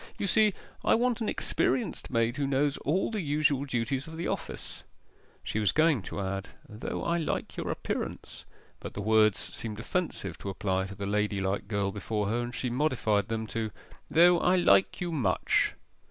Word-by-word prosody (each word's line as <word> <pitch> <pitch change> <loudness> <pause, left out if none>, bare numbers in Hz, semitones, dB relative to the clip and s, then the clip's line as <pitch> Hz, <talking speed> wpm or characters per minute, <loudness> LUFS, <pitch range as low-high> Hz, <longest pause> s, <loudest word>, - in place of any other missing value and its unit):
You - - -2
see, 210 0 +3 0.3
I - - +4
want 240 0 +1
an 220 - 0
experienced 235 -5 0
maid 115 0 +1
who 140 -1 0
knows 140 +1 +2
all 175 +10 0
the 215 -3 -1
usual 145 -2 +1
duties 130 +2 -1
of 160 0 -8
the 170 - -2
office.' - - -5 0.6
She 110 - -2
was 105 -3 +3
going 155 -6 +3
to 95 - -6
add, 95 0 -3 0.2
'Though 105 +2 -5
I 170 0 +1
like 160 - -2
your - - -3
appearance,' - - -4 0.4
but - - -8
the 100 - -3
words 110 -1 +4
seemed 110 -2 -5
offensive 175 +8 -3
to 100 - -5
apply 95 -1 -1
to 100 - -9
the 100 0 -4
ladylike 100 -1 0
girl 100 -2 0
before 105 0 -2
her, 115 +2 0
and 120 0 -5
she 125 - -2
modified 120 -7 +1
them 110 -1 -2
to, 115 -1 -1 0.4
'though 175 +1 +6
I 180 - +3
like 185 +1 +4
you 175 -1 -1
much. 120 - +1
120 Hz, 185 wpm, -29 LUFS, 105-160 Hz, 0.6 s, though